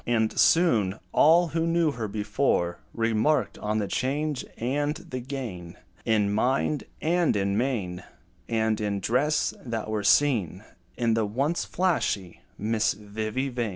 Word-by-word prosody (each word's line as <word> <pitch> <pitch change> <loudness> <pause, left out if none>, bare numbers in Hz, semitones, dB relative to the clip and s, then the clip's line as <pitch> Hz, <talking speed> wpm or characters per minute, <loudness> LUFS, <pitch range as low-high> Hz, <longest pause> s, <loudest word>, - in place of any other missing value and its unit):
And 110 -2 +1
soon, 110 - +4
all 170 +3 +5
who 165 +2 -1
knew 165 -2 +2
her 115 -5 -4
before 105 -4 0
Remarked 115 +1 +1
on 105 +1 -1
the 105 -2 -1
change 145 +3 -1
and 145 +5 -1
the 130 - -7
gain 115 -9 -6 0.3
In 105 -3 +2
mind, 130 +6 0 0.2
and 170 -4 +2
in 100 0 0
mien, 105 -7 -1 0.5
And 110 -1 0
in 100 -1 -1
dress, 135 +9 +1
that 115 -3 -4
were 105 -1 -1
seen 105 - +2 0.3
In 115 -2 +2
the 110 -1 +1
once 140 +10 -1
flashy 155 - -1 0.2
Miss 110 +1 +1
Vivy 110 +5 -3
Vain. 120 -3 -2
115 Hz, 140 wpm, -26 LUFS, 105-140 Hz, 0.5 s, all